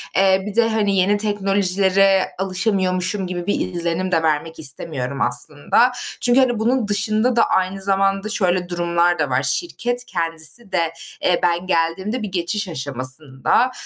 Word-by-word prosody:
Eee, 190 0 +3
bir 210 0 -4
de, 230 -1 +3
hani, 210 -3 0
yeni 200 +3 +2
teknolojilere 195 -2 +2
alışamıyormuşum 185 -1 0 0.2
gibi 175 0 -5
bir 185 -2 -2
izlenim 170 +2 -2
de 165 -2 +1
vermek 160 +1 -1
istemiyorum 140 -2 -1
aslında. 145 - +2 0.3
Çünkü, 245 +1 +3
hani, 245 -4 +1
bunun 235 0 0
dışında 215 +4 +1
da 230 - +4
aynı 190 +1 -1
zamanda 195 +1 0
şöyle 180 -4 0
durumlar 175 0 0
da 150 -3 0
var: 125 +1 0
Şirket 245 -8 0
kendisi 165 +5 -1
de, 165 -3 -1 0.3
eee, 180 - +1
ben 175 +1 0
geldiğimde 190 +8 -1
bir 210 -3 -5
geçiş 190 +3 -1
aşamasında, 135 - -1
185 Hz, 145 wpm, -20 LUFS, 170-205 Hz, 0.3 s, da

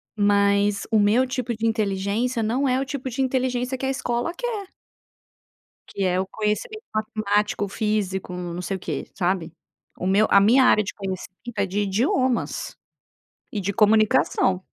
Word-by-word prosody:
Mas 200 0 +2
o 220 - +4
meu 215 +5 +4
tipo 250 -2 -3
de 230 - -2
inteligência 220 +2 0
não 255 +6 +1
é 255 +1 +2
o 270 - -1
tipo 270 -2 -4
de 260 +3 -3
inteligência 255 -1 0
que 265 - -4
a - - 0
escola 245 +2 -1
quer 455 -6 -3 1.2
que 195 - -4
é 185 0 +1
o 190 - -2
conhecimento 220 - -3
matemático, 210 -1 0
físico 200 -3 -2
não 175 -1 -5
sei 190 +2 -3
o - - -15
quê, 155 -5 -4
sabe? 175 -3 -1 0.4
O 185 - -3
meu 205 +3 +4
a 200 - +7
minha 235 +7 +5
área 215 - +5
de 200 - -5
conhecimento 190 +3 -7
é 200 - +2
de 195 +2 -3
idiomas 240 +5 0 0.8
e 210 - -2
de 200 +2 -2
comunicação. 210 -4 +3
210 Hz, 165 wpm, -24 LUFS, 195-250 Hz, 1.2 s, a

